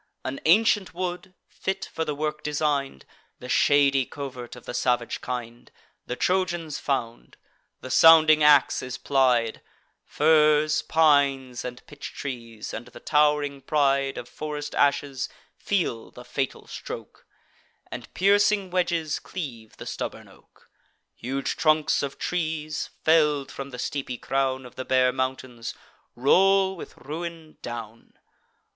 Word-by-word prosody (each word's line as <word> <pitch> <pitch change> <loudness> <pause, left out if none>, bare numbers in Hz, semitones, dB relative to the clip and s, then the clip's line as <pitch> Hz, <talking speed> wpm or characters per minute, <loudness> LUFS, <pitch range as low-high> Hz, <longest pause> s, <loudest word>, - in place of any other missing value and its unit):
An 130 +1 -4
ancient 205 +1 +3
wood, 180 0 -4
fit 195 0 -4
for 160 - -1
the 150 -2 -3
work 150 +1 -3
design'd, 145 - -1 0.3
(The 125 - -10
shady 140 +1 +4
covert 130 -4 -7
of 125 - -13
the - - -6
salvage 120 -2 0
kind,) 120 -1 -6 0.4
The 125 - -3
Trojans 175 -3 -1
found: 115 - -3 0.4
the 130 - -7
sounding 155 0 +7
ax 150 -2 +5
is 125 -1 -5
plied; 125 -5 +2 0.4
Firs, 155 0 +3
pines, 140 -5 +2
and 125 0 -7
pitch 145 -1 -9
trees, 115 -5 -6
and 115 - -6
the - - -12
tow'ring 150 -2 +2
pride 140 -1 +1
Of 120 - -6
forest 150 0 -6
ashes, 140 -1 +1 0.3
feel 170 - -2
the - - -13
fatal - - -3
stroke, - - -9 0.6
And - - -8
piercing 200 0 +3
wedges 170 -4 0
cleave 120 - -8
the - - -9
stubborn - - -5
oak. - - -22 0.5
Huge 135 +3 -3
trunks 155 -1 +3
of 140 -1 -4
trees, 155 -3 -2
fell'd 150 -3 +3
from 135 0 -7
the 125 - -8
steepy 125 0 -3
crown 130 0 -1
Of 125 - -14
the 130 - -3
bare 130 -1 +3
mountains, 130 -2 -4 0.4
roll 190 +9 +4
with 170 - -10
ruin 160 +1 -7
down. 115 -1 -8
145 Hz, 130 wpm, -25 LUFS, 130-160 Hz, 0.6 s, sounding